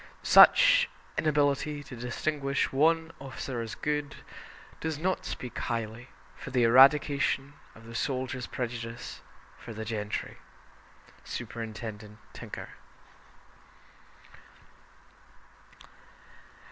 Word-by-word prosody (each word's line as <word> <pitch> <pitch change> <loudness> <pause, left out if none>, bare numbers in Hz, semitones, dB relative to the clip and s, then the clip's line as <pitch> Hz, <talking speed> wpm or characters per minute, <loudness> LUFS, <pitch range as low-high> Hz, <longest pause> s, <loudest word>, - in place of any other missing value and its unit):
Such - - +7 0.3
inability 145 -1 +1
to 130 - -10
distinguish 140 +4 -2
one 160 +3 +2
officer 130 -2 -5
as 110 -2 -6
"good" 150 -1 -2 0.6
does 160 -2 -3
not 185 +4 -1
speak 125 - -6
highly 115 +1 -4 0.3
for - - -9
the 125 -2 +2
eradication 140 +2 +4 0.2
of 115 - -15
the 115 - -10
soldiers' 130 -1 -2
prejudice 115 -1 -5 0.4
for 115 - -9
the 110 +1 -5
gentry. 105 -1 -4 0.9
(Superintendent 110 -2 -7 0.2
Tinker.) - - -8
130 Hz, 85 wpm, -29 LUFS, 115-150 Hz, 0.9 s, Such